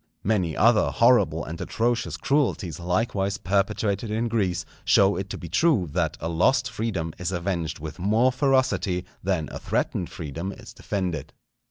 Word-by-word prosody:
Many 95 Hz, -6 st, 0 dB
other 115 Hz, 0 st, +4 dB
horrible 105 Hz, -10 st, +3 dB
and 80 Hz, +2 st, -6 dB
atrocious 120 Hz, +1 st, -1 dB
cruelties 120 Hz, -, 0 dB
likewise 95 Hz, +2 st, 0 dB
perpetrated 100 Hz, +2 st, 0 dB
in 115 Hz, +2 st, -1 dB
Greece, 95 Hz, -7 st, 0 dB, 0.2 s
show 100 Hz, 0 st, +4 dB
it 95 Hz, 0 st, -4 dB
to -, -, -5 dB
be 85 Hz, -, -8 dB
true 105 Hz, -, +2 dB
that -, -, -1 dB
a 80 Hz, -, -3 dB
lost 125 Hz, +10 st, +2 dB
freedom 100 Hz, -8 st, -3 dB
is 90 Hz, 0 st, -2 dB
avenged 85 Hz, -3 st, -2 dB
with 80 Hz, +3 st, -8 dB
more 110 Hz, +7 st, +3 dB
ferocity 130 Hz, -9 st, +1 dB, 0.2 s
than 90 Hz, -5 st, -1 dB
a -, -, -6 dB
threatened 90 Hz, -, -1 dB
freedom 80 Hz, +3 st, -5 dB
is -, -, -12 dB
defended. 90 Hz, -8 st, -3 dB
95 Hz, 155 wpm, -25 LUFS, 85-115 Hz, 0.2 s, other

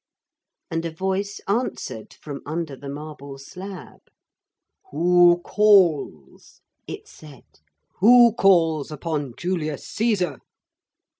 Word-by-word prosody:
And 165 Hz, 0 st, -2 dB
a 165 Hz, -, -3 dB
voice 190 Hz, +4 st, -3 dB
answered 200 Hz, -, -3 dB
from 145 Hz, -2 st, -8 dB
under 160 Hz, -1 st, -4 dB
the 140 Hz, +1 st, -9 dB
marble 145 Hz, -1 st, -8 dB
slab. 185 Hz, +7 st, -10 dB, 0.9 s
'Who 175 Hz, -, +4 dB
calls?' 170 Hz, -, +2 dB, 0.3 s
it -, -, -8 dB
said. 145 Hz, -5 st, -15 dB, 0.6 s
'Who 235 Hz, +2 st, +7 dB
calls 165 Hz, -8 st, +3 dB
upon 150 Hz, -4 st, -4 dB
Julius 165 Hz, -5 st, -3 dB
Caesar?' 200 Hz, -, -1 dB
165 Hz, 95 wpm, -23 LUFS, 145-190 Hz, 0.9 s, Who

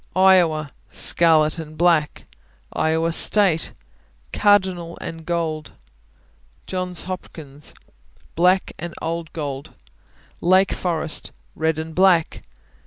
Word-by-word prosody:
Iowa 175 Hz, -6 st, +4 dB, 0.2 s
Scarlet 160 Hz, -2 st, +2 dB
and 155 Hz, -1 st, -9 dB
black. 165 Hz, -3 st, +2 dB, 0.5 s
Iowa 160 Hz, +1 st, +1 dB
State 180 Hz, -1 st, +3 dB, 0.6 s
Cardinal 185 Hz, -5 st, +2 dB
and 165 Hz, -1 st, -8 dB
gold. 160 Hz, -3 st, -2 dB, 0.9 s
Johns 185 Hz, -2 st, -2 dB
Hopkins 155 Hz, -6 st, -7 dB, 0.6 s
Black 180 Hz, +3 st, +2 dB
and 170 Hz, 0 st, -6 dB
old 165 Hz, 0 st, -4 dB
gold. 140 Hz, -3 st, -6 dB, 0.7 s
Lake 185 Hz, +2 st, +4 dB
Forest 165 Hz, -3 st, -3 dB, 0.2 s
Red 160 Hz, 0 st, 0 dB
and 160 Hz, 0 st, -5 dB
black. 180 Hz, -2 st, +3 dB
165 Hz, 95 wpm, -22 LUFS, 155-180 Hz, 0.9 s, Iowa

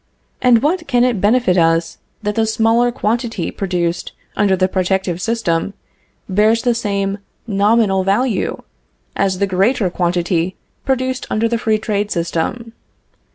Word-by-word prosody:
And 245 Hz, -1 st, +4 dB
what 325 Hz, +2 st, 0 dB
can 245 Hz, -3 st, +3 dB
it 245 Hz, -6 st, +1 dB
benefit 205 Hz, -4 st, +3 dB
us 165 Hz, 0 st, +1 dB, 0.2 s
that 210 Hz, 0 st, -1 dB
the 220 Hz, +1 st, +1 dB
smaller 225 Hz, +2 st, +2 dB
quantity 230 Hz, -5 st, -2 dB
produced 175 Hz, -3 st, -2 dB, 0.2 s
under 200 Hz, -2 st, +2 dB
the 185 Hz, 0 st, +2 dB
protective 185 Hz, -1 st, -1 dB
system 200 Hz, -5 st, -1 dB, 0.5 s
bears 215 Hz, +4 st, +2 dB
the 245 Hz, -2 st, +2 dB
same 200 Hz, -3 st, -2 dB, 0.3 s
nominal 205 Hz, -2 st, +2 dB
value 205 Hz, +3 st, 0 dB, 0.5 s
as 195 Hz, -2 st, 0 dB
the 200 Hz, -, +1 dB
greater 195 Hz, +1 st, +1 dB
quantity 175 Hz, 0 st, 0 dB, 0.3 s
produced 260 Hz, -1 st, -1 dB
under 225 Hz, +2 st, +1 dB
the 235 Hz, 0 st, -1 dB
free 220 Hz, -1 st, +1 dB
trade 210 Hz, -1 st, -2 dB
system? 175 Hz, +7 st, -3 dB
205 Hz, 135 wpm, -18 LUFS, 185-230 Hz, 0.5 s, And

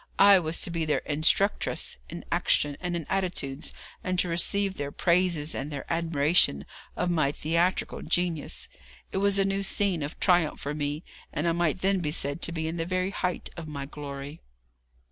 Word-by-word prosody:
I 200 Hz, -1 st, +8 dB
was 160 Hz, -1 st, -1 dB
to -, -, 0 dB
be 165 Hz, -1 st, -1 dB
their 155 Hz, -1 st, 0 dB
instructress 155 Hz, +7 st, +1 dB
in -, -, -7 dB
action 145 Hz, -1 st, +2 dB
and 175 Hz, -1 st, -2 dB
in 165 Hz, -3 st, -3 dB
attitudes, 180 Hz, -8 st, -2 dB, 0.3 s
and 185 Hz, 0 st, -1 dB
to 180 Hz, -, +1 dB
receive 190 Hz, +3 st, +2 dB
their 145 Hz, -5 st, -4 dB
praises 170 Hz, -3 st, +2 dB
and 140 Hz, +2 st, -4 dB
their 140 Hz, -2 st, -5 dB
admiration 160 Hz, -, +3 dB, 0.3 s
of 175 Hz, -, 0 dB
my 155 Hz, -5 st, +2 dB
theatrical 170 Hz, +5 st, 0 dB
genius. 170 Hz, -2 st, -1 dB, 0.4 s
It -, -, -2 dB
was 200 Hz, 0 st, +3 dB
a 195 Hz, -, +3 dB
new 195 Hz, 0 st, 0 dB
scene 195 Hz, -3 st, +1 dB
of 145 Hz, +2 st, -5 dB
triumph 175 Hz, -4 st, +3 dB
for 145 Hz, -, -3 dB
me, 150 Hz, +1 st, -3 dB, 0.3 s
and 150 Hz, +3 st, -1 dB
I -, -, +4 dB
might 170 Hz, +1 st, 0 dB
then 195 Hz, 0 st, +2 dB
be 160 Hz, -4 st, -1 dB
said 145 Hz, +1 st, -1 dB
to -, -, +1 dB
be 160 Hz, -1 st, -2 dB
in 165 Hz, +2 st, -3 dB
the 165 Hz, -, -1 dB
very 185 Hz, +1 st, 0 dB
height 180 Hz, -2 st, -2 dB
of 170 Hz, -2 st, -7 dB
my 140 Hz, -2 st, -5 dB
glory. 140 Hz, +1 st, -7 dB
170 Hz, 185 wpm, -28 LUFS, 150-185 Hz, 0.4 s, I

